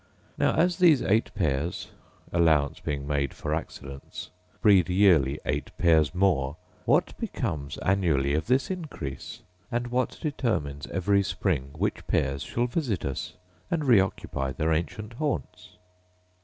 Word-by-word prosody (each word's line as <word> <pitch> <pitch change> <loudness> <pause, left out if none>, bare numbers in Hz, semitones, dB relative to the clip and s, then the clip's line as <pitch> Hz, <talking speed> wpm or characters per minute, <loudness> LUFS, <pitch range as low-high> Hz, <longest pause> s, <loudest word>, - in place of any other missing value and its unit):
Now - - +2
as 180 +3 +2
these 165 -7 +6
eight 110 +3 +2
pairs, 80 -3 -1 0.4
allowance 80 -4 +3
being 70 -1 -3
made 70 -2 -1
for - - -3
accidents, 70 0 -6 0.3
breed 95 -4 +5
yearly 85 -7 +4
eight - - -2
pairs 80 -4 +3
more, 80 -7 +1 0.3
what - - +2
becomes 70 -3 -3
annually 80 -8 +2
of 80 +1 -1
this 130 +7 +2
increase; 145 - -6 0.3
and 120 0 -1
what 125 -1 0
determines 90 - -2
every 100 +2 +2
spring 85 -8 -1
which - - -2
pairs 70 0 0
shall 120 - -1
visit 125 - -2
us, 70 -2 -4 0.3
and 165 -4 -1
reoccupy 95 - +2
their 80 +5 0
ancient 105 +8 -3
haunts 140 -8 -4
90 Hz, 130 wpm, -27 LUFS, 70-115 Hz, 0.4 s, these